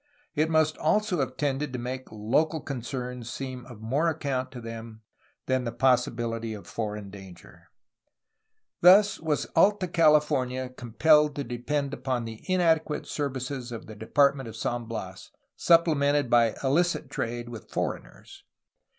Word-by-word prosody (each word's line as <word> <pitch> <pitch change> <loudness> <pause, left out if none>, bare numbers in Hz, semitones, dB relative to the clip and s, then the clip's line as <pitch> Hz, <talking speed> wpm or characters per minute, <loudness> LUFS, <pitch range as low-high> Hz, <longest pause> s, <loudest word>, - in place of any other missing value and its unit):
It 155 0 +1
must 155 -1 +2
also 190 +2 +1
have 130 -1 -2
tended 145 0 -1
to - - -2
make 130 +2 -5
local 130 +10 0
concerns 125 -3 -5
seem 130 0 -6
of 120 -4 -12
more 135 +9 0
account 140 -5 -2
to 125 - -8
them 115 -1 -9 0.4
than 130 -1 0
the 120 - -3
possibiUty 115 -3 0
of 100 - -13
foreign 105 -2 -5
danger. 95 -3 -14 1.1
Thus 195 +3 +7
was 155 -2 -1
Alta 200 -2 +4
California 150 -6 +2
compelled 150 +5 +3
to 140 - -2
depend 140 +4 -3
upon 130 -3 -2
the 110 -1 -9
inadequate 160 -4 +2
services 130 -3 -4
of 115 - -7
the 110 - -10
Department 135 +4 +2
of 110 - -10
San 120 +1 -3
Bias, 95 -5 -7 0.3
supple 170 -1 +4
mented 140 -2 +1
by 115 -2 +4
illicit 170 +6 +1
trade 120 +1 -3
with 115 -3 -10
foreigners. - - -5
130 Hz, 140 wpm, -27 LUFS, 115-150 Hz, 1.1 s, Thus